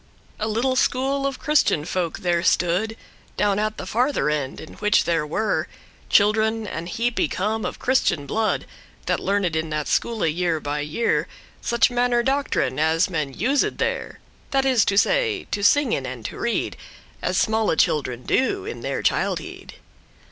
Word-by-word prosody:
A 215 - -1
little 240 +4 0
school 270 +2 +1
of 275 - -4
Christian 295 - +2
folk 175 -2 -2
there 175 -2 +1
stood 180 +6 +1 0.4
Down 205 -1 +2
at 215 0 -1
the - - -6
farther 235 - +1
end, 140 -3 -2
in 160 - -10
which 210 0 +3
there 165 -3 0
were 170 0 0 0.4
Children 220 +2 +3
an 170 -4 -5
heap 235 +5 -1
y - - +3
come 215 +8 -2
of - - -4
Christian 245 - +1
blood, 220 +8 0 0.4
That - - 0
learned 195 -4 0
in 160 0 -1
that 150 -1 -2
schoole 230 -5 0
year 165 0 0
by 145 0 -3
year 150 +11 0 0.3
Such 235 +1 +2
manner 245 0 +2
doctrine 275 - 0
as 165 +4 +2
men 150 -5 -2
used 265 +8 +1
there; - - -2 0.3
This 270 -1 +1
is 255 -4 +4
to 200 - +1
say, 440 - +2
to 205 - -2
singen 290 +7 +3
and - - -7
to - - -6
read, - - -1 0.4
As - - -1
smalle 220 -5 +2
children 125 -4 +1
do 380 - 0
in 450 - -6
their - - -3
childhead. - - -2
210 Hz, 165 wpm, -23 LUFS, 165-245 Hz, 0.4 s, is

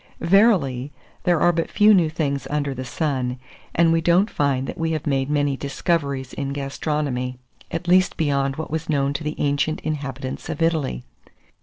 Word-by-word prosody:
Verily, 165 - +3 0.3
there 175 -3 +3
are 175 - +5
but 165 -1 -2
few 215 0 +5
new 175 -5 +4
things 140 -3 -2
under 145 -2 -1
the 130 0 -5
sun, 130 -2 -2 0.4
and 165 0 +4
we 165 - +2
don't 175 +6 +3
find 135 -2 0
that - - -6
we 165 0 0
have 155 - -3
made 135 -2 0
many 145 -2 +1
discoveries 140 -2 -2
in 140 -1 -3
gastronomy, 140 -2 -2 0.3
at 175 - -4
least 185 +1 +4
beyond 140 -3 +1
what 160 0 -6
was 160 +1 -3
known 140 -2 +1
to 140 - -4
the 150 +1 -3
ancient 145 +2 0
inhabitants 135 -4 -4
of - - -4
Italy. 155 - 0
145 Hz, 175 wpm, -22 LUFS, 135-165 Hz, 0.4 s, are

